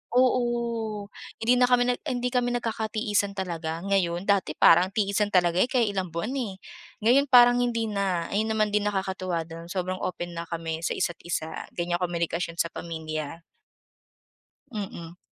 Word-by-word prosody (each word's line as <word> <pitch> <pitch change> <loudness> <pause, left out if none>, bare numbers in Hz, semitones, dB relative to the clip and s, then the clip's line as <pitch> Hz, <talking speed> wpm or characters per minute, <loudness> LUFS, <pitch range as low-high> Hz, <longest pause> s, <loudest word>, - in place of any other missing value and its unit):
Oo, 235 -4 +1 0.3
hindi 245 +3 +3
na 250 - +5
kami 245 -1 +4
nag 245 0 0
en, 245 -1 -1
hindi 250 - 0
kami 245 -1 +1
nagkakatiisan 215 -3 -1
talaga 170 -3 -4
ngayon. 185 -3 +1
Dati 195 -6 +1
parang 175 +3 +6
tiisan 205 0 +1
talaga 180 -3 +2
kaya 250 -2 +2
ilang 195 -3 -1
buwan, 215 +9 -2
eh. 210 -7 -3 0.5
Ngayon 265 +5 +5
parang 245 -2 +7
hindi 230 -3 0
na. 195 -4 0
Ayun 215 +2 +1
naman 215 -1 +1
din, 210 0 +1
nakakatuwa 190 -4 -2
do'n 165 +1 -10
sobrang 185 +1 -3
open 175 -1 -4
na 170 0 -6
kami 165 -1 -4
sa 165 - -2
isa't 175 - -2
isa 160 -2 -2 0.2
ganyan 175 0 -1
komunikasyon 170 -1 -2
sa 170 -1 0
pamilya. 160 -1 -5 1.3
Mm. 175 -5 -6
195 Hz, 155 wpm, -26 LUFS, 170-225 Hz, 1.3 s, parang